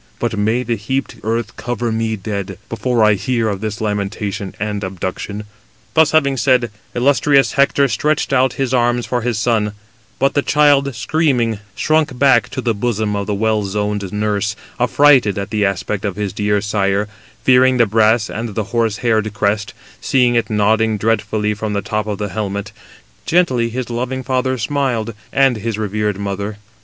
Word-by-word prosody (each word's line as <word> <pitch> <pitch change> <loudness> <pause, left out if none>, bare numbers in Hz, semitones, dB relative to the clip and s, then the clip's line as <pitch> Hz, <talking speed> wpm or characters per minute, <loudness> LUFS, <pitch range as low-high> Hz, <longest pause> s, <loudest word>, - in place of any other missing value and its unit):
But 120 -2 -2
may 110 +4 +1
the 120 -1 -1
heaped 130 +7 -3
earth 115 -1 -2
cover 120 -1 -2
me 110 0 -1
dead, 100 -2 -5
before 115 +1 0
I 105 0 +5
hear 115 +3 0
of 100 -2 -2
this 110 -2 -4
lamentation 100 -2 -3
and 105 0 -3
abduction." 95 +2 -4 0.5
Thus 160 -2 +5
having 140 -3 +2
said, 125 -3 +2 0.2
illustrious 140 +2 +3
Hector 140 0 +3
stretched 150 +2 0
out 130 -1 +3
[his 135 -2 -2
arms] 120 -1 +2
for 125 -1 -1
his 120 -2 -1
son; 110 -2 +1 0.4
but 135 - +2
the 145 - +2
child, 140 -3 +3
screaming, 120 -3 +1 0.2
shrunk 155 -4 +1
back 130 -3 +4
to 130 0 -4
the 120 -2 0
bosom 110 -1 -1
of 100 -1 -3
the 105 - -1
well 110 0 +1
zoned 105 -1 -2
nurse, 105 0 -1 0.2
affrighted 125 -4 +4
at 100 -1 -4
the 105 -2 +1
aspect 100 +1 -2
of 100 -3 -2
his 105 -2 -3
dear 105 0 0
sire, 100 0 0 0.4
fearing 130 0 +5
the 120 - +5
brass 110 +1 +3
and 115 -2 -5
the 110 - 0
horse 115 -3 +1
haired 110 -2 +2
crest, 100 +1 -1 0.3
seeing 125 -2 +2
it 115 -1 +1
nodding 110 +1 +2
dreadfully 105 0 0
from 105 0 -4
the 100 - -1
top 110 0 -2
of 105 -1 -2
the 105 0 -3
helmet: 100 +1 -4 0.6
gently 130 -10 +2
his 125 0 -4
loving 130 +2 -3
father 130 0 0
smiled, 120 -2 -1 0.2
and 135 -3 +3
his 110 0 -3
revered 105 -1 -1
mother. 100 +1 -4
110 Hz, 170 wpm, -18 LUFS, 105-125 Hz, 0.6 s, I